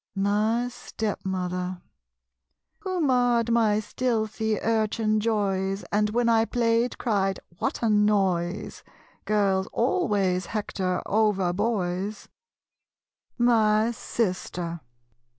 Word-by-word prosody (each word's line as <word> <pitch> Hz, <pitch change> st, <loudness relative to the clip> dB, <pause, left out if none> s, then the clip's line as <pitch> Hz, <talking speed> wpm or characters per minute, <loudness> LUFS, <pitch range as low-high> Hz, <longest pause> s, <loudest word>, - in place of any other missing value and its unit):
My 210 Hz, +5 st, +1 dB
Stepmother. 185 Hz, -6 st, -4 dB, 1.0 s
Who 375 Hz, -4 st, -2 dB
marred 245 Hz, -4 st, +2 dB
my 220 Hz, -3 st, +3 dB
stealthy 220 Hz, -2 st, -1 dB
urchin 220 Hz, -1 st, +1 dB
joys 195 Hz, -3 st, -1 dB
And 210 Hz, +1 st, +2 dB
when 235 Hz, +2 st, +1 dB
I 225 Hz, -1 st, +4 dB
played 235 Hz, 0 st, +1 dB
cried 195 Hz, -4 st, 0 dB, 0.2 s
"What -, -, -2 dB
a 230 Hz, -, +3 dB
noise?" 195 Hz, -3 st, +1 dB, 0.4 s
Girls 195 Hz, -3 st, +1 dB
always 200 Hz, -, +1 dB
hector 190 Hz, -4 st, -2 dB
over 200 Hz, -4 st, +1 dB
boys 200 Hz, -1 st, -2 dB, 1.1 s
My 225 Hz, -2 st, +3 dB
Sister. 180 Hz, -7 st, -3 dB
210 Hz, 90 wpm, -26 LUFS, 190-230 Hz, 1.1 s, I